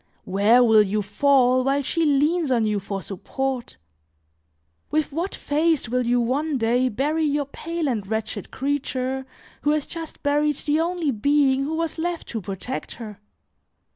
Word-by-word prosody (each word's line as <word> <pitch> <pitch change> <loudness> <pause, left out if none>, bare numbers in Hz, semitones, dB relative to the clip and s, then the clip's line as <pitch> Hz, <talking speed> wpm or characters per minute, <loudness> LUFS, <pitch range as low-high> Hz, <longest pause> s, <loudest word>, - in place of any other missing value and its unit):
Where 205 +6 +4
will 220 -2 +6
you 210 +1 0
fall 255 +4 +3
while 275 +2 +1
she 330 +4 0
leans 300 +3 +2
on 235 -4 +2
you 210 -1 0
for 195 0 -5
support? 260 +6 -4 1.1
With 310 -1 0
what 340 +7 -3
face 310 -1 +1
will 250 0 0
you 245 +1 +3
one 275 +5 0
day 245 +2 +2
bury 295 +8 0
your 290 -1 +1
pale 330 +3 -4
and 215 -7 -2
wretched 220 -2 -3
creature, 265 -1 -2 0.3
who 295 - +1
has 300 -1 +1
just 330 -2 -8
buried 295 +1 +2
the 295 +3 0
only 335 -3 0
being 275 +3 +2
who 315 +3 -2
was 330 0 -2
left 345 0 -3
to 225 - -4
protect 195 +7 -5
her? 215 -4 -9
270 Hz, 160 wpm, -23 LUFS, 235-300 Hz, 1.1 s, will